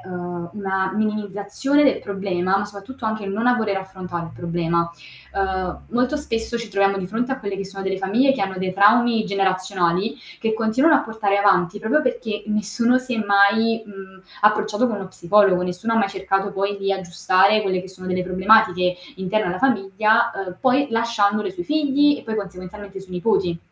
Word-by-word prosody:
uhm, 175 -1 -6
una 190 -2 -1
minimizzazione 215 +6 0
del 265 - +3
problema 190 -1 -1
ma 200 - -1
soprattutto 205 +5 -10
anche 220 -2 -2
non 210 +5 -2
a 245 - +5
voler 220 -5 -1
affrontare 185 -3 -6
il - - -12
problema. 170 0 -1 0.4
Uhm, 190 -2 -2
molto 250 +5 +1
spesso 230 -5 -2
ci 235 -1 -6
troviamo 195 -1 +2
di 180 - -4
fronte 235 +6 -2
a 265 - -3
quelle 200 -3 -5
che 195 - -4
sono 195 0 -8
delle 190 0 -2
famiglie 230 +8 +2
che 270 - -4
hanno 195 -1 -2
dei 185 0 -2
traumi 220 +3 +4
generazionali 190 -1 0 0.2
che 225 -1 0
continuano 235 +8 +3
a - - +2
portare 220 -3 -1
avanti 195 -1 +2
proprio 220 +8 +1
perché 220 - -3
nessuno 215 +3 +1
si 255 -1 -4
è 225 - -1
mai, 205 +3 +3
mhmm, 190 -2 -12 0.2
approcciato 210 +2 +2
con 225 -4 -2
uno 195 -2 -7
psicologo, 185 0 +3
nessuno 180 +6 -3
ha - - +2
mai 200 - +2
cercato 195 0 -1
poi 200 +1 -2
di 195 0 -2
aggiustare 190 +2 +2
quelle 190 -2 0
che 185 - -10
sono 185 0 -11
delle 185 0 -1
problematiche 185 -1 +3 0.2
interne 190 +3 -1
alla 180 - -3
famiglia, 220 -1 +2
uhm, 185 -2 -6
poi 260 +2 +3
lasciandole 225 - +1
sui 360 -2 -6
figli 290 -2 +2
e - - -11
poi 220 -1 -4
consequenzialmente 195 0 -8
i - - -10
suoi 185 -1 -11
nipoti. 180 -3 0
200 Hz, 185 wpm, -21 LUFS, 190-225 Hz, 0.4 s, a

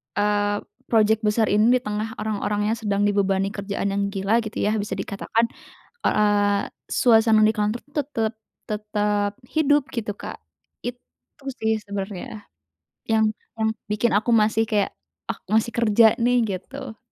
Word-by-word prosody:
eee, 205 0 +1 0.2
project 220 -1 +3
besar 215 +1 +2
ini, 210 +2 +4
di 250 - +1
tengah 210 +2 -3
orang-orangnya 210 0 -1
sedang 205 -2 0
dibebani 195 -1 +1
kerjaan 200 -1 -3
yang 200 0 0
gila 200 +3 +1
gitu 220 -1 -3
ya 210 - +2
bisa 205 -1 -3
dikatakan. 210 +4 -1 0.6
Eee, 205 -1 +2 0.2
suasana 225 -3 +4
dikantor 215 +1 +1
tuh - - -30
tetap 225 -6 -1 0.4
tetap 210 -1 0 0.2
hidup 290 -3 +3
gitu, 215 -4 -3
Kak. - - -8 0.4
Itu 245 +3 -10 0.2
sih 220 0 +1
sebenarnya 200 +1 -6 0.6
yang 220 -1 +3 0.2
yang 220 0 +2 0.2
bikin 210 +2 +1
aku 215 +4 +2
masih 220 0 +4
kayak, 205 -2 +1 0.4
aku - - -6 0.2
masih 235 +1 -6
kerja 225 -1 +5
nih, 245 +1 +4
gitu. 220 +5 -6
210 Hz, 135 wpm, -23 LUFS, 205-225 Hz, 0.6 s, kerja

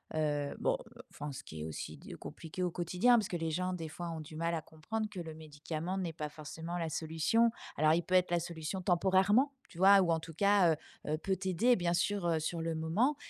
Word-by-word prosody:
heu 145 -2 0
bon - - +2 0.3
enfin 150 0 -6
ce 135 - -7
qui 80 0 -8
est - - -3
aussi 80 - -6
d - - -10
compliqué 165 +3 -7
au 180 - 0
quotidien 180 +8 +3
parce 215 -4 0
que 175 - -1
les 165 -1 -2
gens 180 +3 -1
des 165 -3 -4
fois 170 +2 -5
ont 165 - -5
du 155 +1 -10
mal 165 +2 -1
à 160 - -2
comprendre 165 +8 -4
que 205 -3 -7
le 160 -2 -7
médicament 155 +3 -5
n'est 180 -3 -2
pas 155 -1 -4
forcément 160 +3 -6
la 165 -2 -2
solution. 165 +10 +2 0.3
Alors, 155 +1 +5
il 170 +1 +2
peut 185 - 0
être 180 -1 +4
la 175 - +3
solution 170 +2 -4
temporairement, 190 - +3 0.2
tu - - -15
vois? 195 +1 +8
Ou 175 -2 +2
en 165 - +2
tout 165 +1 -9
cas, 200 -1 +4
heu, - - -1 0.4
heu, - - +1
peut 190 +4 -1
t'aider 195 +6 +3
bien 175 -2 +1
sûr, 175 +1 +1
heu, 165 -2 +2
sur 165 +2 -2
le 165 0 -1
moment 180 - +1
170 Hz, 240 wpm, -33 LUFS, 160-190 Hz, 0.4 s, vois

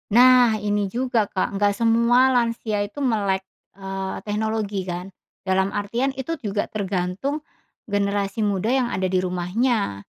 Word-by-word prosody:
Nah 245 -1 +6
ini 205 -1 -1
juga 245 -1 +1
Kak, 195 +1 -1
nggak 205 +1 +3
semua 235 +4 +4
lansia 230 -3 0
itu 205 +8 -8
melek, 200 -7 0 0.3
eee, 195 0 -4
teknologi 210 -2 -1
kan. 180 0 -5 0.3
Dalam 190 0 0
artian 230 +7 -1
itu 270 +5 -4
juga 210 -8 -2
tergantung 200 +7 -2 0.5
generasi 200 0 -1
muda 205 0 0
yang 250 -2 +1
ada 185 0 0
di 185 - +1
rumahnya, 185 - -1
205 Hz, 135 wpm, -23 LUFS, 195-235 Hz, 0.5 s, Nah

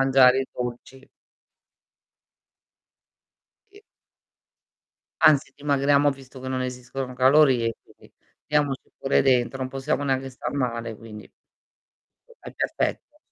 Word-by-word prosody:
mangiare 135 -1 +5
i 135 - -3
dolci. 125 +2 -7 2.6
Che 410 +1 -17 1.4
Anzi 150 -3 +4
dimagriamo 145 0 +2
visto 135 -1 -11
che 130 - -6
non 130 -1 -2
esistono 125 +1 -5
calorie 130 -3 +4
quindi, - - -21 0.3
diamoci 145 -2 -1
pure 135 - +2
dentro 130 -1 +2
non 130 -1 -3
possiamo 135 +3 -2
neanche 135 -1 -1
star 125 -1 -6
male 115 -5 -3
quindi 105 -1 -11 1.1
è - - -10
perfetto. 295 - -3
130 Hz, 105 wpm, -24 LUFS, 125-140 Hz, 2.6 s, mangiare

